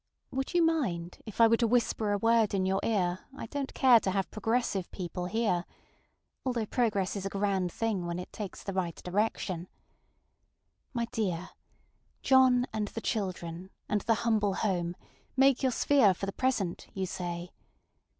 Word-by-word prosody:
Would 270 +5 -3
you 345 - +5
mind 190 - -1
if 215 - -9
I 230 - +9
were 230 +1 +4
to 235 - +2
whisper 225 -2 +1
a 205 - +2
word 225 -1 +3
in 190 -1 +1
your 190 +1 +1
ear 185 -5 +1 0.2
I - - -5
donŌĆÖt 275 +3 -4
care 250 -3 +7
to 195 - -2
have 190 0 -1
progressive 220 -3 -1
people 180 -1 -4
hear? 210 -4 +1 0.8
ŌĆöalthough 240 -5 -2
progress 205 -6 +1
is 195 -1 -3
a - - -3
grand 195 -3 0
thing 205 -5 -1
when 170 0 -3
it 180 - -7
takes 205 -3 -6
the 195 - -4
right 180 -3 -1
direction. 185 -2 -1 1.2
My 235 -3 -1
dear, 190 -8 -2 0.7
John 260 -2 +5
and 215 -1 -1
the 225 - -6
children, 185 -5 -3 0.2
and 210 -1 0
the 225 - +2
humble 210 -4 +2
home, 175 -4 -1 0.4
make 270 -1 +5
your 260 -2 +2
sphere 235 -5 +4
for 195 - -4
the 195 - -4
present, 235 -9 -1
you 190 -1 -1
say. 175 -1 -5
205 Hz, 170 wpm, -30 LUFS, 185-235 Hz, 1.2 s, I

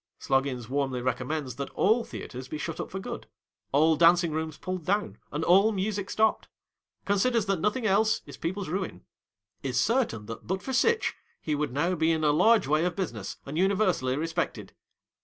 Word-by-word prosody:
Sloggins 135 -3 0
warmly 135 -1 -1
recommends 130 +1 -2
that 140 -1 -4
all 225 +4 +3
Theatres 130 - -8
be 155 - -5
shut 160 +1 -5
up - - -4
for 190 - -5
good, - - -6 0.4
all 155 +3 +4
Dancing 170 +1 +5
Rooms 160 0 -3
pulled 185 -2 -4
down, 205 +5 -1
and 150 +2 -2
all 195 +6 +5
music 200 0 -2
stopped. 220 0 +1 0.6
Considers 210 +2 +2
that 195 -3 0
nothing 210 +7 0
else 215 +2 +2
is - - -10
people's 185 +1 -4
ruin. 180 - -4 0.6
Is 125 -2 -1
certain 225 - +1
that 115 +1 -8
but 190 +1 -2
for 265 - -4
sitch, 455 - +2 0.3
he 155 - -2
would 145 -2 -1
now 155 +8 +1
be 160 -1 +2
in 160 -1 0
a 150 - +4
large 210 +7 +4
way 155 +3 +2
of 180 0 -1
business 120 - -4
and 150 +4 -4
universally 185 -9 +2
respected. 165 +2 -3
165 Hz, 180 wpm, -28 LUFS, 140-200 Hz, 0.6 s, Dancing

